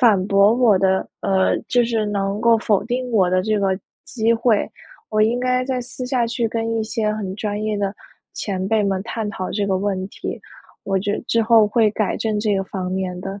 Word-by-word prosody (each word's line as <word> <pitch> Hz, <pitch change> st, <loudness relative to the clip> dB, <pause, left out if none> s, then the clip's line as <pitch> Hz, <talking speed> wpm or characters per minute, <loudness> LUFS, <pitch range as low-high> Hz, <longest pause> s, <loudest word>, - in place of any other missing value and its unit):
反 210 Hz, -7 st, +4 dB
驳 200 Hz, +1 st, +5 dB
我 240 Hz, -5 st, +4 dB
的， 190 Hz, 0 st, +1 dB
呃， 190 Hz, -1 st, +2 dB
就 245 Hz, -1 st, +3 dB
是 225 Hz, -2 st, 0 dB
能 200 Hz, 0 st, -2 dB
够 230 Hz, -1 st, +5 dB
否 210 Hz, -2 st, +1 dB
定 250 Hz, +2 st, -2 dB
我 185 Hz, -5 st, +3 dB
的 185 Hz, 0 st, +2 dB
这 215 Hz, 0 st, 0 dB
个 190 Hz, -1 st, 0 dB, 0.3 s
机 225 Hz, -1 st, +1 dB
会。 230 Hz, -2 st, +2 dB, 0.4 s
我 215 Hz, 0 st, +2 dB
应 235 Hz, +3 st, +1 dB
该 255 Hz, 0 st, +1 dB
在 255 Hz, -1 st, -2 dB
私 250 Hz, +1 st, -7 dB
下 250 Hz, -2 st, 0 dB
去 235 Hz, 0 st, -1 dB
跟 225 Hz, 0 st, -2 dB
一 225 Hz, -, 0 dB
些 220 Hz, -2 st, -1 dB
很 195 Hz, -3 st, -4 dB
专 210 Hz, 0 st, -3 dB
业 215 Hz, -1 st, -1 dB
的 200 Hz, 0 st, -1 dB, 0.4 s
前 190 Hz, -2 st, -3 dB
辈 220 Hz, -1 st, +2 dB
们 195 Hz, -1 st, 0 dB
探 220 Hz, -1 st, -4 dB
讨 185 Hz, -3 st, -5 dB
这 205 Hz, -1 st, -1 dB
个 190 Hz, -, +1 dB
问 190 Hz, -1 st, -2 dB
题， -, -, -6 dB, 0.5 s
我 195 Hz, -1 st, 0 dB
觉 205 Hz, +1 st, -1 dB
得 -, -, -2 dB
之 230 Hz, 0 st, +2 dB
后 220 Hz, -1 st, +5 dB
会 215 Hz, 0 st, +3 dB
改 215 Hz, -2 st, -1 dB
正 215 Hz, -2 st, -1 dB
这 210 Hz, -2 st, +1 dB
个 195 Hz, -, 0 dB
方 185 Hz, -1 st, -4 dB
面 185 Hz, -1 st, -3 dB
的。 195 Hz, +1 st, -6 dB
210 Hz, 235 characters per minute, -21 LUFS, 195-230 Hz, 0.5 s, 驳